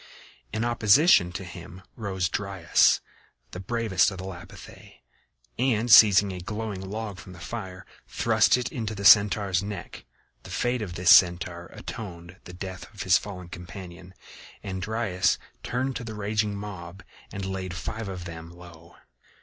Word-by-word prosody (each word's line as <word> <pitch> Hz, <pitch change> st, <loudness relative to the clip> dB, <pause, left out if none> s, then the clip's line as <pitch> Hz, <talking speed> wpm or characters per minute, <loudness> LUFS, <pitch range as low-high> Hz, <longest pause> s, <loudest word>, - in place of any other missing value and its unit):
In 110 Hz, +2 st, -2 dB
opposition 115 Hz, -, +4 dB
to 95 Hz, -, -5 dB
him 90 Hz, +1 st, -11 dB
rose 95 Hz, -5 st, -2 dB
Dryas, 95 Hz, -2 st, +2 dB, 0.5 s
the -, -, -7 dB
bravest 110 Hz, -1 st, +1 dB
of 95 Hz, -, -8 dB
the 90 Hz, -, -7 dB
Lapithæ, 90 Hz, -1 st, -11 dB, 0.6 s
and 120 Hz, -2 st, +1 dB
seizing 100 Hz, -2 st, +7 dB
a 90 Hz, -, -6 dB
glowing 105 Hz, +1 st, -5 dB
log 105 Hz, -2 st, -5 dB
from 95 Hz, -, -11 dB
the 85 Hz, -, -13 dB
fire, 95 Hz, -1 st, -7 dB, 0.2 s
thrust 110 Hz, 0 st, +3 dB
it 125 Hz, 0 st, -3 dB
into 110 Hz, -2 st, -4 dB
the 100 Hz, 0 st, -6 dB
Centaur's 100 Hz, -2 st, +5 dB
neck. 100 Hz, -2 st, -7 dB, 0.4 s
The -, -, -13 dB
fate 125 Hz, 0 st, -1 dB
of 90 Hz, -5 st, -5 dB
this 90 Hz, -1 st, +7 dB
Centaur 85 Hz, -1 st, +2 dB
atoned 90 Hz, -5 st, -8 dB
for 95 Hz, -, -21 dB
the 90 Hz, -, -10 dB
death 95 Hz, 0 st, -8 dB
of 100 Hz, -, -5 dB
his 95 Hz, +1 st, +4 dB
fallen 90 Hz, -4 st, -9 dB
companion, 90 Hz, +1 st, -10 dB, 0.5 s
and 95 Hz, -2 st, -5 dB
Dryas 105 Hz, -3 st, 0 dB, 0.2 s
turned 130 Hz, +2 st, -2 dB
to -, -, -7 dB
the 110 Hz, -2 st, -7 dB
raging 105 Hz, 0 st, -1 dB
mob 95 Hz, -3 st, -8 dB, 0.3 s
and 100 Hz, -1 st, -5 dB
laid 95 Hz, -1 st, -4 dB
five 110 Hz, +4 st, -5 dB
of 90 Hz, -2 st, -7 dB
them 80 Hz, -1 st, -8 dB
low. 85 Hz, -1 st, -15 dB
95 Hz, 155 wpm, -26 LUFS, 90-110 Hz, 0.6 s, seizing